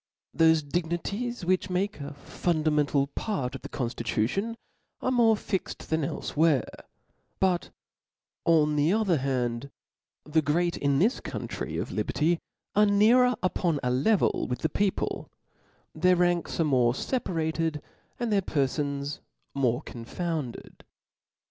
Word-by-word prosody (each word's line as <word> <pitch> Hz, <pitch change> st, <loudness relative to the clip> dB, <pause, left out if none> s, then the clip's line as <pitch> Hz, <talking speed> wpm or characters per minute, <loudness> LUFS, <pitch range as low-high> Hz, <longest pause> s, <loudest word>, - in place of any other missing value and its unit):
Thofe 160 Hz, -2 st, +4 dB
dignities 175 Hz, +8 st, -2 dB
which 185 Hz, +1 st, +1 dB
make 190 Hz, +2 st, -1 dB
a 145 Hz, 0 st, -7 dB
fundamental 150 Hz, -3 st, +1 dB
part 140 Hz, -, -3 dB
of 135 Hz, -, -7 dB
the -, -, -8 dB
conftitution 120 Hz, -, -1 dB, 0.4 s
are 255 Hz, -, 0 dB
more 230 Hz, -3 st, +4 dB
fixed 190 Hz, -5 st, -4 dB
than 160 Hz, -1 st, +1 dB
elfewhere; 145 Hz, -1 st, +1 dB, 0.7 s
but, 185 Hz, -2 st, +1 dB, 0.7 s
on 150 Hz, -2 st, +3 dB
the 150 Hz, +3 st, +3 dB
other 200 Hz, -7 st, +2 dB
h^nd, 130 Hz, -1 st, -1 dB, 0.5 s
the 155 Hz, +1 st, +2 dB
great 170 Hz, +4 st, +1 dB
in 140 Hz, -1 st, +1 dB
this 215 Hz, -, +2 dB
country -, -, -5 dB
of -, -, -3 dB
liberty, 165 Hz, +3 st, 0 dB, 0.4 s
are 210 Hz, +1 st, +5 dB
nearer 235 Hz, +5 st, +5 dB
upon 175 Hz, -4 st, +1 dB
a 125 Hz, -, +1 dB
level 180 Hz, -, +2 dB
with 125 Hz, -, -3 dB
the 160 Hz, -, +1 dB
people; 200 Hz, +5 st, -1 dB, 0.6 s
their 180 Hz, 0 st, +4 dB
ranks 175 Hz, -1 st, +1 dB
are -, -, +4 dB
more 125 Hz, -5 st, +3 dB
feparated, 160 Hz, -, -1 dB, 0.4 s
and 235 Hz, -3 st, 0 dB
their 200 Hz, -, +3 dB
perfons 140 Hz, -2 st, -1 dB, 0.3 s
more 130 Hz, 0 st, +1 dB
confounded. 140 Hz, +2 st, -5 dB
160 Hz, 125 wpm, -27 LUFS, 140-190 Hz, 0.7 s, are